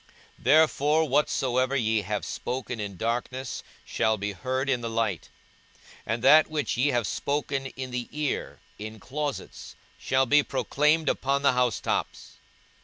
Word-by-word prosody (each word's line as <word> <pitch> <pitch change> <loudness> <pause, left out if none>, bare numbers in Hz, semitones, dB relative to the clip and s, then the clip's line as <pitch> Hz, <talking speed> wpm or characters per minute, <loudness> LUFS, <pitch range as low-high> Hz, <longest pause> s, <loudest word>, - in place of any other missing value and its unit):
42:012:003 - - -22
Therefore 155 0 +4
whatsoever 130 -2 +1
ye 110 -4 +1
have 105 +1 -3
spoken 125 -2 -4
in 100 -3 -5
darkness 120 +3 -3 0.2
shall 110 0 +1
be 105 +1 -3
heard 130 +6 -2
in 130 -3 +1
the 115 - -3
light; 110 -8 -1 0.8
and 115 +2 -2
that 155 +4 +7
which 145 -9 -2
ye 125 +4 +2
have 120 -5 +1
spoken 140 0 -2
in 130 -1 -7
the 125 -1 -3
ear 150 -2 -3 0.2
in 110 +1 -7
closets 130 - -5 0.2
shall 130 0 +2
be 145 +3 +5
proclaimed 150 +3 +1
upon 140 +1 0
the 140 - +5
housetops. 125 -5 -1
130 Hz, 145 wpm, -27 LUFS, 115-140 Hz, 0.8 s, that